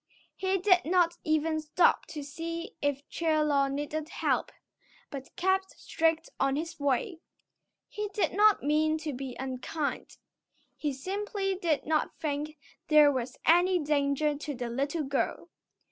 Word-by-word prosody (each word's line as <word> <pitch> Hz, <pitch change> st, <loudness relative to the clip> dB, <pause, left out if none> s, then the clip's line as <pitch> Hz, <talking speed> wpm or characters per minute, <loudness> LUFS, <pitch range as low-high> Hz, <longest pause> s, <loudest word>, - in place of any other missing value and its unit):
He 380 Hz, 0 st, 0 dB
did 365 Hz, -1 st, +4 dB
not 345 Hz, 0 st, +2 dB
even 315 Hz, 0 st, +1 dB
stop 310 Hz, +3 st, +3 dB
to 300 Hz, -2 st, -6 dB
see 335 Hz, +7 st, -6 dB
if 285 Hz, -1 st, -1 dB
Chie 320 Hz, -2 st, 0 dB
Lo 280 Hz, -2 st, +2 dB
needed 295 Hz, +3 st, -3 dB
help, -, -, 0 dB, 0.6 s
but 270 Hz, -2 st, -8 dB
kept 380 Hz, +1 st, 0 dB
straight 325 Hz, 0 st, 0 dB
on 270 Hz, 0 st, +2 dB
his 325 Hz, +2 st, -4 dB
way. 285 Hz, -, 0 dB, 0.7 s
He 420 Hz, 0 st, -4 dB
did 400 Hz, 0 st, 0 dB
not 420 Hz, +1 st, +5 dB
mean 310 Hz, +2 st, +2 dB
to 310 Hz, -2 st, -4 dB
be 260 Hz, -1 st, -6 dB
unkind. 265 Hz, +3 st, -4 dB, 0.6 s
He 295 Hz, -, -2 dB
simply 390 Hz, +7 st, -2 dB
did 340 Hz, -6 st, 0 dB
not 310 Hz, 0 st, 0 dB
think 300 Hz, 0 st, -3 dB, 0.3 s
there 300 Hz, -2 st, +7 dB
was 255 Hz, -1 st, -3 dB
any 355 Hz, +3 st, +5 dB
danger 295 Hz, -1 st, +1 dB
to 290 Hz, 0 st, -5 dB
the 240 Hz, -1 st, -4 dB
little 280 Hz, +6 st, -1 dB
girl. 275 Hz, 0 st, -2 dB
310 Hz, 145 wpm, -29 LUFS, 285-345 Hz, 0.7 s, there